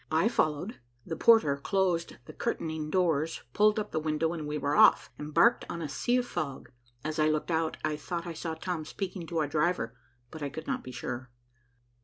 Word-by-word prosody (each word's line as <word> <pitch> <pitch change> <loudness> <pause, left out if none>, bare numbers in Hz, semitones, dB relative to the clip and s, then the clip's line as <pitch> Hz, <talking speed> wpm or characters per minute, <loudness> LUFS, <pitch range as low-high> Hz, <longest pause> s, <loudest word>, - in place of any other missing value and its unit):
I 160 +8 +3
followed, 155 0 0 0.3
the 165 - -3
porter 220 -9 +5
closed 175 +2 0
the - - -10
curtaining 155 -1 -2
doors, 165 -3 +1
pulled 210 +1 +4
up 210 - -2
the 155 - 0
window, 155 +1 0
and 155 -3 -4
we 150 0 -2
were 145 0 0
off, - - +6
embarked 150 +11 +3
on 170 - -4
a 160 - -3
sea 240 - +1
of 250 - 0
fog. 140 - -4 0.3
As 155 +1 -3
I 155 0 +4
looked 155 +2 -1
out, 160 -1 0
I 155 -1 -1
thought 170 +3 -4
I 170 - -4
saw 160 0 -4
Tom 165 0 -3
speaking 185 +1 -5
to 165 - -3
our 155 -2 +2
driver, 150 -5 0 0.4
but 160 - -8
I 145 - -2
could 160 +3 -7
not - - -2
be 130 - -8
sure. 125 0 -5
160 Hz, 205 wpm, -30 LUFS, 150-175 Hz, 0.4 s, off